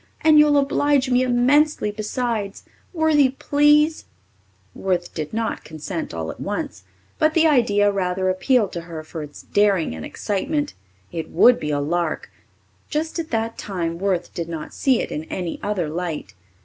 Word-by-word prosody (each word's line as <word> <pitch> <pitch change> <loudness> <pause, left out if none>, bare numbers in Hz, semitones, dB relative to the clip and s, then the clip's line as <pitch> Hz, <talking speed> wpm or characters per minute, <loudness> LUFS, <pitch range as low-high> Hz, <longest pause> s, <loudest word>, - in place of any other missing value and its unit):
And 310 -1 +6
you'll 300 -1 +5
oblige 280 -1 +2
me 250 0 +4
immensely 255 0 +3
besides. 215 -1 -3 0.3
Worthie, 315 -5 +3
please." 295 +2 +3 0.7
Worth 180 -2 -2
did 155 -2 -4
not 225 0 -2
consent 160 +2 -5
all 80 -1 -4
at - - -13
once; 95 - -4 0.4
but 310 0 +2
the 330 -1 +5
idea 210 -9 +4
rather 185 -1 -1
appealed 205 +3 +2
to 170 - -4
her 165 -2 -8
for 155 +1 -7
its 145 -1 -10
daring 200 - +2
and 80 -1 -7
excitement. 290 - -2 0.4
It 165 -1 -5
would 250 0 +5
be 150 - -3
a 145 -1 0
lark 165 +2 -2 0.6
just 315 +3 -2
at 320 - -4
that 225 0 -2
time 170 -4 -3
Worth 185 -3 -1
did 170 -1 -4
not 160 -2 -6
see 260 -4 +2
it - - -5
in 155 +1 -4
any 175 -1 -4
other 200 -5 -1
light. 165 0 -4
205 Hz, 160 wpm, -22 LUFS, 170-275 Hz, 0.7 s, And